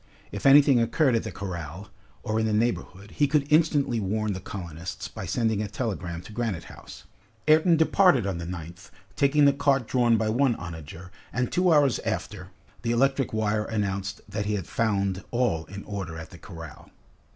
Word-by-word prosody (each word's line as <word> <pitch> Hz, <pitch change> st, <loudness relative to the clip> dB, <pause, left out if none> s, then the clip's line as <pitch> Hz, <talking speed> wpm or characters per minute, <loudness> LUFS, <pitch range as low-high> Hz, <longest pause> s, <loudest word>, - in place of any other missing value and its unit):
If 100 Hz, +5 st, -1 dB
anything 140 Hz, -3 st, +7 dB
occurred 125 Hz, +4 st, +2 dB
at 115 Hz, -, +2 dB
the 110 Hz, -, -6 dB
corral, 90 Hz, -1 st, -7 dB, 0.3 s
or 110 Hz, +1 st, -1 dB
in 110 Hz, -, +1 dB
the 110 Hz, -, 0 dB
neighborhood, 105 Hz, -3 st, -2 dB
he 145 Hz, -, +2 dB
could 145 Hz, 0 st, +2 dB
instantly 145 Hz, -6 st, +3 dB
warn 105 Hz, +1 st, -1 dB
the 95 Hz, -, -5 dB
colonists 85 Hz, -2 st, -7 dB
by -, -, -7 dB
sending 110 Hz, -3 st, 0 dB
a 105 Hz, -, -2 dB
telegram 95 Hz, -7 st, -4 dB
to 105 Hz, -, -12 dB
Granite 110 Hz, -7 st, -2 dB
House. -, -, -12 dB, 0.4 s
Ayrton 160 Hz, +2 st, +5 dB
departed 160 Hz, -3 st, +4 dB
at 100 Hz, -, -1 dB
dawn -, -, -5 dB
on 85 Hz, -, -6 dB
the 90 Hz, -, -4 dB, 0.2 s
9th, 90 Hz, +3 st, -17 dB, 0.3 s
taking 145 Hz, +3 st, +4 dB
the 140 Hz, -, +5 dB
cart 140 Hz, -3 st, +1 dB
drawn 120 Hz, -3 st, +3 dB
by 110 Hz, 0 st, 0 dB
one 125 Hz, +2 st, +2 dB
onager, 85 Hz, 0 st, -9 dB, 0.2 s
and 125 Hz, 0 st, -1 dB
two 180 Hz, 0 st, +3 dB
hours 145 Hz, -5 st, +4 dB
after, 105 Hz, -4 st, -4 dB, 0.3 s
the 115 Hz, -, -3 dB
electric 135 Hz, +2 st, +2 dB
wire 110 Hz, -1 st, 0 dB
announced 100 Hz, -3 st, -3 dB
that 105 Hz, 0 st, -3 dB
he 105 Hz, -, 0 dB
had 95 Hz, -5 st, -3 dB
found 100 Hz, 0 st, -1 dB
all 120 Hz, -10 st, 0 dB
in 100 Hz, +1 st, -9 dB
order 95 Hz, -6 st, -5 dB
at 80 Hz, 0 st, -9 dB
the 90 Hz, -, -12 dB
corral. 80 Hz, -6 st, -11 dB
110 Hz, 190 wpm, -26 LUFS, 95-130 Hz, 0.4 s, anything